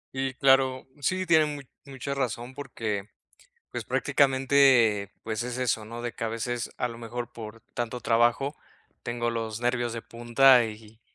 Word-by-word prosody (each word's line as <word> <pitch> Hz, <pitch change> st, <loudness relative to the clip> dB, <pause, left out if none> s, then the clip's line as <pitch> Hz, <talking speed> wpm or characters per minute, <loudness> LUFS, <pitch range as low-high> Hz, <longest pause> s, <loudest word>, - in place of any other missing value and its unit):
Y, 130 Hz, 0 st, -2 dB
claro 135 Hz, -1 st, +3 dB, 0.2 s
sí, 185 Hz, +6 st, 0 dB
tiene 160 Hz, -3 st, +5 dB
mu 145 Hz, -1 st, -5 dB, 0.3 s
mucha 135 Hz, +1 st, -4 dB
razón 125 Hz, -2 st, -3 dB
porque, 115 Hz, -8 st, -4 dB, 0.7 s
pues -, -, -5 dB
prácticamente, 130 Hz, -7 st, +3 dB
pues 110 Hz, 0 st, -3 dB
es 125 Hz, 0 st, -4 dB
eso, 115 Hz, -4 st, -1 dB
¿no? 115 Hz, +1 st, -7 dB
De 120 Hz, -1 st, -3 dB
que 115 Hz, -, -5 dB
a -, -, 0 dB
veces 115 Hz, +1 st, -3 dB
a 125 Hz, -, -1 dB
lo 115 Hz, -1 st, -9 dB
mejor 120 Hz, +1 st, -6 dB
por 110 Hz, 0 st, -9 dB
tanto 120 Hz, 0 st, -3 dB
trabajo 120 Hz, +5 st, +2 dB, 0.5 s
tengo 120 Hz, 0 st, -2 dB
los 115 Hz, -1 st, -4 dB
nervios 120 Hz, -1 st, 0 dB
de 115 Hz, -, -5 dB
punta 120 Hz, +2 st, +5 dB
y 110 Hz, 0 st, -11 dB
120 Hz, 160 wpm, -27 LUFS, 115-135 Hz, 0.7 s, tiene